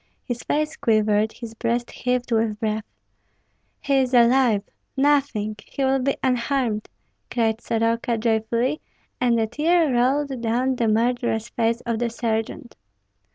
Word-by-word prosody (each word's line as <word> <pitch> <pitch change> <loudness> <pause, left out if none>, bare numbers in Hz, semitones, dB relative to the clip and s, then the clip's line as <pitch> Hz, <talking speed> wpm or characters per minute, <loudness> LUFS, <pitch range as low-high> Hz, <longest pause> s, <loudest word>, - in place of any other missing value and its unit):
His 245 -2 -4
face 300 +1 -1
quivered, 215 -1 +2
his 230 -2 -9
breast 235 +1 -2
heaved 250 0 -2
with 220 -2 +1
breath. 215 -1 -2 1.0
"He 275 -1 +1
is 255 -1 +1
alive! 240 -3 +4 0.3
nothing! 270 -7 +1
he 275 - -4
will 265 0 +2
be 270 +2 0
unharmed," 250 -3 0 0.4
cried 225 -1 0
Soroka, 230 +1 0
joyfully; 230 +5 0 0.4
and 240 -2 +2
a 225 - +2
tear 305 +5 +2
rolled 265 +1 +1
down 245 +3 0
the 230 - +1
murderous 230 0 0
face 230 0 0
of 230 -2 -2
the 240 -1 0
sergeant. 225 +1 -3
235 Hz, 135 wpm, -23 LUFS, 225-260 Hz, 1.0 s, alive